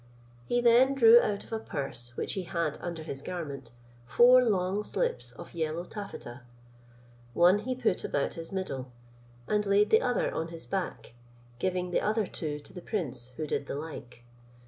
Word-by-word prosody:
He 245 - +1
then 245 +3 +5
drew 235 -2 +8
out 200 -1 -2
of - - -11
a 225 - -1
purse 130 - -5
which - - -2
he 195 - -2
had 170 -4 -2
under 170 -2 -5
his 140 -3 -6
garment, 145 -8 -6 0.4
four 250 - +7
long 195 -3 +1
slips - - -2
of - - -11
yellow 165 0 -2
taffety; 180 - -8 1.0
one 180 +4 +6
he 255 +4 -3
put 235 -7 0
about 140 - -1
his 165 -1 -8
middle, 135 -10 -4 0.6
and 210 0 +1
laid 205 +1 +3
the 220 - +6
other 250 -1 0
on 165 - -2
his 165 -1 -9
back, 190 -10 -4 0.5
giving 180 +1 -1
the - - +2
other 215 0 +1
two 150 -4 -4
to - - -15
the 180 - -8
prince, 160 - -2
who 155 - -2
did 140 - -2
the - - -4
like. 140 -6 -8
180 Hz, 175 wpm, -29 LUFS, 155-215 Hz, 1.0 s, drew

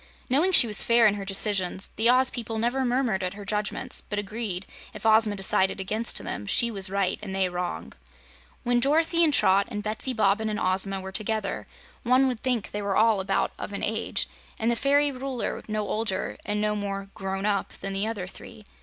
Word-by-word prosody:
Knowing 315 +8 +3
she 335 - +9
was 210 -3 +6
fair 235 0 +4
in 210 - +5
her 205 -1 -5
decisions, 195 -1 0
the 225 +2 +3
Oz 255 +1 +5
people 225 -2 -4
never 240 +4 0
murmured 245 -6 0
at 185 +1 -3
her 205 -1 -9
judgments, 210 0 -2
but 210 - -6
agreed, 205 -2 -4 0.3
if - - -8
Ozma 220 -1 +5
decided 190 0 +1
against 215 +4 -1
them, 100 - -5
she 235 - +2
was 195 -3 -1
right 195 -1 -1
and 195 -2 -6
they 190 -1 +1
wrong. 180 0 -5 0.7
When 245 -1 +2
Dorothy 320 +6 +3
and 315 - +4
Trot 200 -5 +3
and 210 -3 -5
Betsy 215 +5 -1
Bobbin 220 -1 +1
and 210 -1 -3
Ozma 195 0 0
were 190 0 -7
together, 215 +1 -3 0.3
one 255 +2 +3
would 250 -3 -2
think 245 -5 -1
they 205 - -4
were 200 -1 -1
all 220 -2 +4
about 190 - 0
of 205 - -6
an 200 - -5
age, 220 +1 -1 0.3
and 225 +2 0
the - - +1
fairy 285 +3 +2
Ruler 260 -2 -4
no 215 -1 -2
older 210 -3 -2
and 210 0 -1
no 210 0 0
more 195 -1 -4
"grown 195 +1 -4
up" 205 -2 -1
than 195 - -5
the 195 +2 0
other 210 -5 -4
three. 205 +2 -11
210 Hz, 205 wpm, -26 LUFS, 195-235 Hz, 0.7 s, she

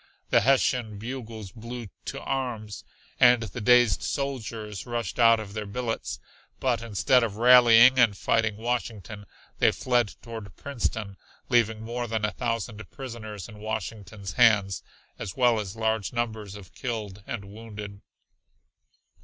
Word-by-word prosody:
The - - +5
Hessian 125 -5 +2
bugles 110 -3 -7
blew 115 +2 -7 0.2
"to - - -4
arms" 115 -6 -4 0.4
and 120 -1 +6
the 110 +3 -6
dazed 120 -2 +5
soldiers 115 -6 -4
rushed 120 -1 -3
out 115 -1 +6
of 105 -2 -8
their 105 -1 -4
billets, 115 +2 -3 0.4
but 125 -3 +1
instead 115 +3 +2
of 110 -3 -2
rallying 120 +1 +7
and 110 -5 +4
fighting 110 -2 +1
Washington 110 -3 -4 0.3
they - - +5
fled 120 -4 0
toward 115 -3 -8
Princeton, 110 -7 -3 0.3
leaving 115 -2 +2
more 120 +1 -3
than 110 -1 -1
a 105 - -1
thousand 115 -2 -4
prisoners 110 -7 -7
in 110 -2 -12
Washington's 110 -2 -5
hands, 100 -4 +4 0.4
as 90 - -6
well 120 -3 +4
as 100 -1 -5
large 110 -1 -1
numbers 110 -4 -3
of 100 -4 -12
killed 105 -6 -5
and 110 -4 -5
wounded. 105 -1 -9
115 Hz, 135 wpm, -27 LUFS, 105-120 Hz, 0.4 s, rallying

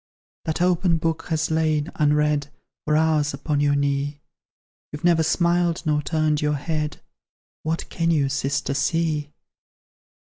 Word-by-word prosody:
That 160 +2 0
open 180 -1 +2
book 165 0 -2
has 160 -1 -1
lain, 155 -1 +1
unread, 150 -1 +1 0.4
For 150 0 +2
hours 155 -2 +2
upon 145 +1 -1
your 145 0 +2
knee; 140 +1 -1 0.7
You've 150 +2 -8
never 170 -2 +4
smiled 170 +1 +1
nor 150 -1 +2
turned 155 -1 0
your 150 0 +1
head; 150 +1 -3 0.6
What 160 +1 -2
can 165 -1 -1
you, 150 -4 +2
sister, 135 0 -1
see?" 155 0 0
155 Hz, 135 wpm, -23 LUFS, 145-165 Hz, 0.7 s, never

